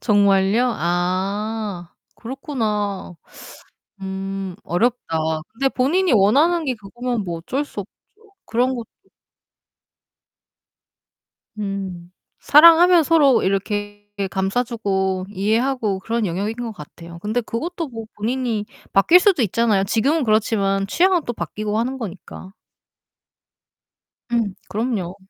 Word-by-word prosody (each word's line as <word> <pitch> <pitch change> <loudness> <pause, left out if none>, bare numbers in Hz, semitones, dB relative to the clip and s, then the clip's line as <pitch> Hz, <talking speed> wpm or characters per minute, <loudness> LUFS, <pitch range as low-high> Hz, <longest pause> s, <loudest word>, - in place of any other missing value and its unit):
정말요? 200 +2 +3
아 185 +2 -2 0.2
그렇구나. 215 - -3 0.9
음 195 -1 -5
어렵다. 215 -2 0 0.3
근데 270 +4 0
본인이 325 +8 +1
원하는 295 - +3
게 260 - 0
그거면 235 +2 -4
뭐 170 -2 -4
어쩔 270 - -3
수 205 - -6
없죠. 195 - -14 0.5
그런 250 +3 +1
것도 235 -3 -6 2.7
음 195 -4 -5 0.3
사랑하면 335 +3 +7
서로 295 -4 +4
이렇게 205 +1 -2 0.2
감싸주고 195 -2 -1
이해하고 215 +1 0
그런 225 +3 -2
영역인 200 +6 -2
것 240 -2 -5
같아요. 170 -1 -11
근데 215 +6 -1
그것도 330 +9 -4
뭐 225 -3 -7
본인이 230 -1 -2 0.3
바뀔 330 - +6
수도 380 - +3
있잖아요. 215 -2 +2
지금은 265 +9 +1
그렇지만 200 -3 +1
취향은 355 - +2
또 240 - -2
바뀌고 215 -2 -3
하는 255 +4 -2
거니까. 190 -2 -8 1.8
음. 225 -5 0
그럼요. 205 -5 -2
215 Hz, 240 characters per minute, -21 LUFS, 195-250 Hz, 2.7 s, 사랑하면